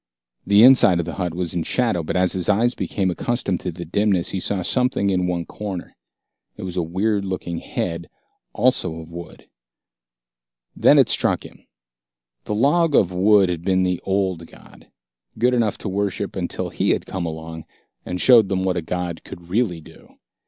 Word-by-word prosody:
The 100 Hz, +2 st, +6 dB
inside 125 Hz, -8 st, +7 dB
of 85 Hz, -, -1 dB
the 85 Hz, -, -5 dB
hut 90 Hz, -2 st, -2 dB
was 90 Hz, -2 st, -2 dB
in 85 Hz, -, -1 dB
shadow, 115 Hz, -1 st, 0 dB
but 80 Hz, -, -4 dB
as 90 Hz, -1 st, +2 dB
his 90 Hz, 0 st, -2 dB
eyes 115 Hz, +4 st, +3 dB
became 95 Hz, -2 st, -2 dB
accustomed 100 Hz, -1 st, -2 dB
to 90 Hz, -, -4 dB
the 85 Hz, +1 st, -8 dB
dimness, 95 Hz, +1 st, +1 dB
he 95 Hz, -, -2 dB
saw 95 Hz, 0 st, -1 dB
something 125 Hz, -2 st, +1 dB
in 90 Hz, -1 st, 0 dB
one 85 Hz, -1 st, -2 dB
corner. 100 Hz, -4 st, -7 dB, 0.6 s
It -, -, -8 dB
was 90 Hz, -1 st, -5 dB
a 90 Hz, -, 0 dB
weird 100 Hz, +5 st, -1 dB
looking 90 Hz, -3 st, -4 dB
head, 85 Hz, -2 st, -4 dB, 0.4 s
also 80 Hz, -, +1 dB
of 80 Hz, 0 st, -10 dB
wood. 85 Hz, 0 st, -10 dB, 1.3 s
It -, -, +5 dB
struck -, -, +1 dB
him -, -, -13 dB
then. -, -, -31 dB, 0.8 s
The 105 Hz, -, -2 dB
log 150 Hz, +6 st, +2 dB
of 95 Hz, -, +3 dB
wood 95 Hz, +1 st, +4 dB
had 85 Hz, -2 st, -3 dB
been 95 Hz, +1 st, +1 dB
the 90 Hz, -1 st, -1 dB
old 95 Hz, -4 st, -1 dB
god, -, -, -18 dB, 0.5 s
good 125 Hz, +3 st, +2 dB
enough 115 Hz, -4 st, +1 dB
to -, -, -7 dB
worship 100 Hz, 0 st, -2 dB
until 90 Hz, -3 st, -3 dB
he -, -, -1 dB
had -, -, -3 dB
come 90 Hz, -3 st, -4 dB
along 80 Hz, 0 st, -7 dB, 0.4 s
and 90 Hz, -, -5 dB
shown 115 Hz, -3 st, +6 dB
them 95 Hz, -1 st, -1 dB
what 95 Hz, -1 st, 0 dB
a -, -, -1 dB
god 90 Hz, 0 st, -4 dB
could 85 Hz, 0 st, -12 dB
really 95 Hz, -5 st, 0 dB
do. -, -, -18 dB
95 Hz, 185 wpm, -21 LUFS, 85-100 Hz, 1.3 s, inside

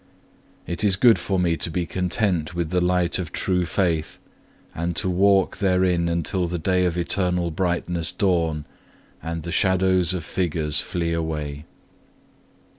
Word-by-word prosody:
It 85 Hz, +4 st, -3 dB
is 100 Hz, -2 st, +5 dB
good 115 Hz, +2 st, +5 dB
for 95 Hz, -, -1 dB
me 85 Hz, -2 st, +2 dB
to -, -, -2 dB
be 85 Hz, +1 st, -2 dB
content 90 Hz, -1 st, -1 dB
with 85 Hz, -2 st, -2 dB
the 90 Hz, -1 st, +1 dB
light 90 Hz, 0 st, +1 dB
of 85 Hz, -4 st, -5 dB
true 90 Hz, -2 st, 0 dB
faith, 85 Hz, -3 st, -1 dB, 0.6 s
and 85 Hz, +1 st, -3 dB
to 85 Hz, -, 0 dB
walk 95 Hz, +1 st, +3 dB
therein 90 Hz, -3 st, +2 dB
until 85 Hz, +2 st, -1 dB
the 90 Hz, +1 st, -3 dB
day 90 Hz, +2 st, +1 dB
of 90 Hz, -1 st, -1 dB
eternal 90 Hz, -1 st, 0 dB
brightness 85 Hz, -1 st, -1 dB
dawn, 85 Hz, -7 st, 0 dB, 0.6 s
and 80 Hz, -1 st, -5 dB
the 85 Hz, -, -5 dB
shadows 95 Hz, -1 st, +2 dB
of 85 Hz, -4 st, -5 dB
figures 80 Hz, -5 st, -1 dB
flee 85 Hz, -1 st, -2 dB
away. 75 Hz, -2 st, -4 dB
90 Hz, 150 wpm, -23 LUFS, 85-95 Hz, 0.6 s, is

